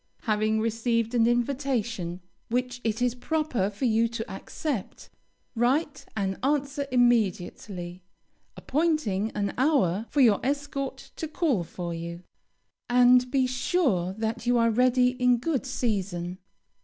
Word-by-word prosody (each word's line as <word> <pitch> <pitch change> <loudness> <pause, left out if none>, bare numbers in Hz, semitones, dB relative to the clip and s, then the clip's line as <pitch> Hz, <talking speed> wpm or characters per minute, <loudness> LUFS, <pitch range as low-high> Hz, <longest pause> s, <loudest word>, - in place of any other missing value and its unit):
Having 215 0 +1
received 230 +1 0
an 230 -1 +4
invitation 240 -8 -1 0.3
which 250 +1 -2
it 225 +1 0
is 245 -1 +2
proper 250 -6 -1
for 205 +5 -4
you 230 0 +3
to 230 -1 -5
accept, 230 +3 -5 0.4
write 275 +5 0
an 195 -2 -1
answer 280 0 0
immediately, 195 -6 0 0.6
appointing 280 - 0
an 200 -1 -1
hour 235 - +2
for 290 - +2
your 220 -6 +5
escort 280 0 -3
to 320 - -3
call 300 - 0
for 170 +1 -6
you, 170 +1 -6 0.7
and 250 0 +5
be 265 -1 +2
sure 250 - 0
that 220 +3 -3
you 245 0 +4
are 230 -1 +3
ready 250 +2 +4
in 250 -1 +2
good 270 +1 -2
season. 190 -8 -2
240 Hz, 130 wpm, -27 LUFS, 205-260 Hz, 0.7 s, your